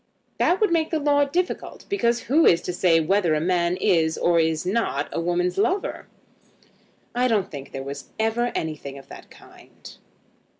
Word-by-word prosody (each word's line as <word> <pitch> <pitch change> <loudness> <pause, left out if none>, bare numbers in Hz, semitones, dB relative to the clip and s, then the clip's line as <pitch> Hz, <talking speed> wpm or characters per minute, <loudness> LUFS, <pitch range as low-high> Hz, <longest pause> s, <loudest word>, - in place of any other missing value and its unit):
"That 360 - +2
would 425 -5 +2
make 325 -2 +1
the 320 - 0
law 285 -1 +2
difficult, 350 +6 -3
because 240 - 0
who 310 +6 +3
is 170 0 +4
to 180 - -3
say 175 -2 +3
whether 170 0 +2
a - - +1
man 175 +1 0
is 160 -3 +2
or 170 -1 +2
is 160 0 0
not 185 -8 -1
a - - -2
woman's 175 +2 -1
lover?" 375 - -1 1.1
"I 250 +1 +2
don't 210 -5 0
think 140 -2 -8
there 135 - -6
was 140 +1 -8
ever 225 +2 0
anything 150 -3 -4
of 135 - -14
that - - -12
kind." - - -16
180 Hz, 175 wpm, -23 LUFS, 160-250 Hz, 1.1 s, is